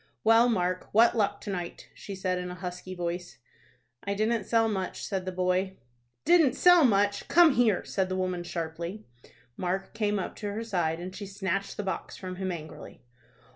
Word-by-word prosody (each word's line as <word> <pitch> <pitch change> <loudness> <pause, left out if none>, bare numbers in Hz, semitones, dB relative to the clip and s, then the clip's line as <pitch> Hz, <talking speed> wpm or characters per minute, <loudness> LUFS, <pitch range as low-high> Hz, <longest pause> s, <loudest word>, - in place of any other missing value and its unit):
"Well, 225 +2 +6
Mark, 185 -4 -1
what 230 +3 +5
luck 210 -3 0
to 205 - -5
night?" 175 -2 -6
she 200 - -8
said, 185 -1 -1
in 180 0 -5
a 180 - -6
husky 180 +1 -6
voice. 175 0 -4 0.7
"I 200 0 -2
didn't 220 +2 0
sell 225 -1 +3
much," 190 -4 -3
said 190 -2 -3
the 185 - -3
boy. 185 +1 0 0.5
"Didn't 325 -6 +5
sell 355 -2 +6
much? 205 -4 +2
Come 340 -4 +6
here," 230 -6 +3
said 190 -1 -1
the 185 - -1
woman, 185 -1 -1
sharply. 170 +3 -5 0.5
Mark 185 +2 -2
came 210 -1 0
up 190 - -4
to 205 -2 -4
her 220 +2 -3
side, 175 -7 -1
and 185 +2 -7
she 205 - -6
snatched 195 0 -3
the 205 - -2
box 190 - -4
from 185 -1 -7
him, 190 -1 -2
angrily. 160 -3 -9
190 Hz, 185 wpm, -28 LUFS, 180-215 Hz, 0.7 s, Well